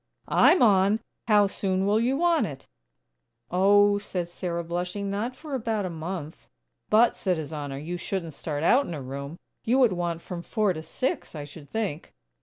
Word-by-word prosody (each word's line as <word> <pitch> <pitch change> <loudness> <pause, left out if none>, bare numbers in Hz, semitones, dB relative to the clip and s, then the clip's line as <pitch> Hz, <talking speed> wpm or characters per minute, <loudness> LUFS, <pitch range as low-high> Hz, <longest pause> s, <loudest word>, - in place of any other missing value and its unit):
I'm 360 - +5
on! 200 -1 +4 0.3
How 210 -2 +5
soon 190 -1 -1
will 210 +2 +3
you 250 +4 +1
want 340 -1 +3
it?" 135 -3 -9 0.9
"Oh," 205 +3 +5
said 180 -4 -4
Sarah, 170 -1 -3
blushing, 180 +4 -3
"not 225 +6 -2
for 300 +1 -9
about 225 -5 -1
a 180 - -3
month." 165 -1 -6 0.4
"But," 225 +3 +5
said 185 -3 0
His 160 0 -6
Honor, 145 -2 -4
"you 165 +5 -4
shouldn't 175 -3 -4
start 145 +1 -4
out 265 +11 +4
in 170 - -4
a 145 - -6
room. 140 +4 -6 0.3
You 245 +4 +2
would 245 -7 +5
want 170 -2 -3
from 175 -2 -6
four 210 +1 0
to 160 - -6
six 255 - -3
I 150 - -5
should 145 0 -12
think." 205 -8 -4
185 Hz, 185 wpm, -26 LUFS, 165-215 Hz, 0.9 s, I'm